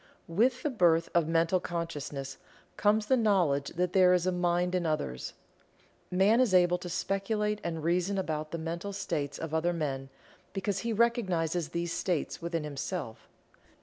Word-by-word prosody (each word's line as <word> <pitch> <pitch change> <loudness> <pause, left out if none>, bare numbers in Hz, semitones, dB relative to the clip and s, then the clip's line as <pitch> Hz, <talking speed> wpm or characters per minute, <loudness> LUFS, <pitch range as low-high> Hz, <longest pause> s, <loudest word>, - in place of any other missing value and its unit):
With 240 +9 +1
the 300 - 0
birth 170 -7 +3
of 170 -2 +3
mental 165 +2 +2
consciousness 145 -6 -5 0.4
comes 210 +1 +2
the 260 - +3
knowledge 180 - +2
that 180 +1 0
there 185 -1 +6
is 180 -1 0
a 185 - +2
mind 180 0 +1
in 180 -1 +1
others. 155 - -2 0.8
Man 200 +6 +4
is 220 -7 +3
able 180 0 +4
to 180 - -7
speculate 210 +3 -1
and 165 -2 -3
reason 180 +4 +1
about 155 -4 -2
the 170 - -4
mental 170 +5 -4
states 145 -7 -3
of 160 -1 -6
other 165 +2 +1
men, 135 -5 -3 0.4
because 195 0 -1
he 235 - -2
recognizes 185 -8 +1
these 170 0 -2
states 175 -3 -2
within 165 -1 -2
himself. 145 -3 -5
175 Hz, 160 wpm, -30 LUFS, 160-195 Hz, 0.8 s, there